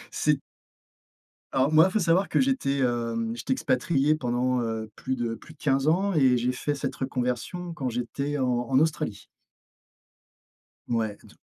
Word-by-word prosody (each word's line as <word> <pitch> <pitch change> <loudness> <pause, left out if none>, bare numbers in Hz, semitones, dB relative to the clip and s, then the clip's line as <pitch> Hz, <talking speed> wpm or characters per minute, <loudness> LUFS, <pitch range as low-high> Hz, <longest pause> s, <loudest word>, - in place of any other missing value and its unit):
c'est - - +2 1.2
alors 135 +3 +2
moi, 155 +1 +7
il - - -4
faut 215 - +1
savoir 175 +2 +3
que - - +1
j'étais, 260 - +1
hem, 115 -2 0
j'étais 130 - -1
expatrié 140 +4 +1
pendant, 125 -2 0
heu, 110 -2 -3
plus 130 - -3
de 120 -2 -2
plus 155 +6 -11
de - - -27
15 135 -1 +1
ans 190 +5 +2
et 130 -5 +4
j'ai 120 +1 +1
fait 145 +3 -2
cette 140 - -3
reconversion 130 +7 -3
quand 140 -6 -3
j'étais 140 +4 -3
en 130 -2 +1 0.2
en 130 -1 +4
Australie. 160 +1 -1 1.6
Ouais 110 -3 -1
donc - - -18
130 Hz, 160 wpm, -26 LUFS, 120-155 Hz, 1.6 s, moi